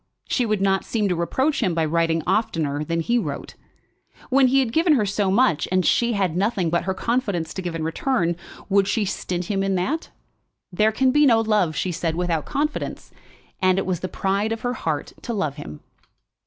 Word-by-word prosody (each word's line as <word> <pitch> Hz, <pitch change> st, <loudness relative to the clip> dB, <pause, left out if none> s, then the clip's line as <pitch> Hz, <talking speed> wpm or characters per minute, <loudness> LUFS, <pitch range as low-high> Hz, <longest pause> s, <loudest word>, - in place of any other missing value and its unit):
She 245 Hz, -3 st, 0 dB
would 215 Hz, -2 st, 0 dB
not 195 Hz, -1 st, +2 dB
seem 215 Hz, -3 st, -1 dB
to 180 Hz, -, +1 dB
reproach 265 Hz, -, 0 dB
him 185 Hz, -7 st, +1 dB
by 165 Hz, -1 st, +1 dB
writing 165 Hz, 0 st, +1 dB
oftener 165 Hz, -8 st, 0 dB
than 165 Hz, +2 st, -1 dB
he 235 Hz, +8 st, +1 dB
wrote. 150 Hz, -10 st, -5 dB, 0.8 s
When 265 Hz, 0 st, +5 dB
he 265 Hz, +2 st, +3 dB
had 245 Hz, -4 st, 0 dB
given 325 Hz, 0 st, +4 dB
her 230 Hz, -7 st, +2 dB
so 200 Hz, 0 st, 0 dB
much, 195 Hz, -, +2 dB
and 185 Hz, -1 st, +2 dB
she 235 Hz, 0 st, +2 dB
had 190 Hz, -6 st, 0 dB
nothing 190 Hz, -3 st, 0 dB
but 170 Hz, -, 0 dB
her 190 Hz, 0 st, -1 dB
confidence 210 Hz, -8 st, -1 dB
to 190 Hz, -, -4 dB
give 175 Hz, -2 st, -4 dB
in 165 Hz, -, -3 dB
return, 170 Hz, +1 st, 0 dB, 0.3 s
would 195 Hz, -1 st, +3 dB
she 210 Hz, +1 st, +1 dB
stint 180 Hz, -1 st, -3 dB
him 195 Hz, +1 st, -1 dB
in 195 Hz, 0 st, 0 dB
that? 210 Hz, -, -2 dB, 0.6 s
There 210 Hz, +4 st, +2 dB
can 260 Hz, +4 st, +2 dB
be 295 Hz, +1 st, +5 dB
no 230 Hz, -3 st, +5 dB
love, 210 Hz, -8 st, +1 dB
she 185 Hz, -, -1 dB
said, 165 Hz, -1 st, -2 dB
without 170 Hz, -3 st, -1 dB
confidence, 300 Hz, +1 st, -3 dB, 0.5 s
and 185 Hz, 0 st, +3 dB
it 195 Hz, -, 0 dB
was 185 Hz, -3 st, -1 dB
the 185 Hz, -, -3 dB
pride 200 Hz, +3 st, -1 dB
of 225 Hz, -, -3 dB
her 245 Hz, 0 st, -1 dB
heart 160 Hz, -10 st, -3 dB
to 235 Hz, -, -4 dB
love 155 Hz, -8 st, -2 dB
him. 75 Hz, -, -9 dB
195 Hz, 210 wpm, -23 LUFS, 170-230 Hz, 0.8 s, When